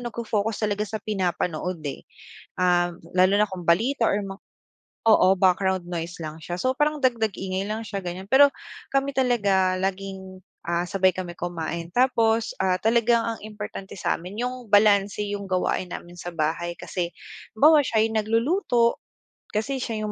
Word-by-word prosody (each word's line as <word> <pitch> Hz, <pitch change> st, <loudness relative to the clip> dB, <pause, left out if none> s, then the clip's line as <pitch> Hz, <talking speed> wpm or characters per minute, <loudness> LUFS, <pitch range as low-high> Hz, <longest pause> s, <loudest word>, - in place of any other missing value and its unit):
nagfo-focus 225 Hz, -3 st, -2 dB
talaga 210 Hz, 0 st, 0 dB
sa 220 Hz, -, -3 dB
pinapanood, 180 Hz, -3 st, -2 dB
eh, 140 Hz, -, -5 dB, 0.6 s
ah, 175 Hz, -1 st, +3 dB, 0.2 s
lalo 185 Hz, +1 st, +5 dB
na 210 Hz, -, +2 dB
kung 180 Hz, -3 st, -7 dB
balita 230 Hz, +9 st, +2 dB
or 205 Hz, -1 st, +1 dB
mga 195 Hz, 0 st, -7 dB, 0.7 s
oo, 190 Hz, -3 st, +6 dB
background 190 Hz, -1 st, +2 dB
noise 170 Hz, 0 st, -4 dB
lang 155 Hz, 0 st, -6 dB
siya. 175 Hz, +2 st, -5 dB
So 260 Hz, 0 st, +1 dB
parang 300 Hz, 0 st, +1 dB
dagdag 230 Hz, -5 st, +1 dB
ingay 190 Hz, +1 st, -3 dB
lang 220 Hz, +1 st, -3 dB
siya, 200 Hz, 0 st, -4 dB
ganyan. 180 Hz, +2 st, -5 dB
Pero 280 Hz, +2 st, +7 dB, 0.4 s
kami 275 Hz, +1 st, +1 dB
talaga 200 Hz, -7 st, +2 dB
laging, 190 Hz, 0 st, -4 dB, 0.3 s
ah, 170 Hz, +1 st, 0 dB
sabay 190 Hz, 0 st, +2 dB
kami 180 Hz, -2 st, -5 dB
kumain 170 Hz, -1 st, -4 dB
tapos, 230 Hz, -3 st, +2 dB
ah, 185 Hz, -1 st, +2 dB
talagang 235 Hz, +1 st, +3 dB
ang 230 Hz, -1 st, -3 dB
importante 210 Hz, -2 st, -8 dB
sa'min 180 Hz, +3 st, -3 dB
yung 250 Hz, -2 st, -4 dB
balanse 205 Hz, 0 st, +4 dB
yung 200 Hz, -1 st, -4 dB
gawain 185 Hz, 0 st, 0 dB
namin 175 Hz, 0 st, -8 dB
sa 175 Hz, -, -5 dB
bahay, 165 Hz, +2 st, -1 dB
kasi 175 Hz, -2 st, -3 dB, 0.4 s
halimbawa 300 Hz, +7 st, +6 dB
siya 220 Hz, -2 st, +2 dB
yung 220 Hz, -, -2 dB
nagluluto, 235 Hz, -, +1 dB, 0.5 s
kasi 260 Hz, +6 st, -2 dB
siya 220 Hz, -3 st, -3 dB
yung 210 Hz, -, -3 dB
200 Hz, 160 wpm, -25 LUFS, 180-230 Hz, 0.7 s, Pero